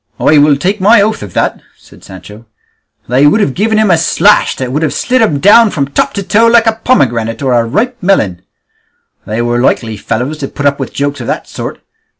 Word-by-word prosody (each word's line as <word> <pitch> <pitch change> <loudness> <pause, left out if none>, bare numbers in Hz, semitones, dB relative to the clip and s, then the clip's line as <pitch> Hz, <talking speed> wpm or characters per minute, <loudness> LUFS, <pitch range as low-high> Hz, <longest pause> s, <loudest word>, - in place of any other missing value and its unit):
"I 150 - +3
will 145 0 +4
take 190 +7 -2
my 215 +4 +5
oath 215 +2 0
of 100 -4 -9
that," - - -1 0.2
said - - -20
Sancho; 105 +4 -13 0.6
"they 130 +4 +3
would 205 - +2
have 145 -11 0
given 220 +5 0
him 215 -3 +2
a 170 - +3
slash 185 +5 +2
that 130 -1 -5
would 150 +4 -2
have 155 -3 -2
slit 255 0 0
him 155 -11 +1
down 215 +6 +5
from 140 -7 -2
top - - -1
to 200 - -3
toe 220 +4 +2
like 230 0 +4
a 225 0 -1
pomegranate 115 - 0
or 130 -2 0
a 120 -1 +2
ripe 240 - -2
melon; 110 - 0 0.9
they 110 +3 -2
were 120 0 -1
likely 115 -3 -1
fellows 130 +10 -4
to 135 - -4
put 145 - -6
up 140 0 +1
with - - -5
jokes 145 -1 -3
of 120 - -7
that - - -4
sort! - - -7
145 Hz, 220 wpm, -11 LUFS, -, 0.9 s, my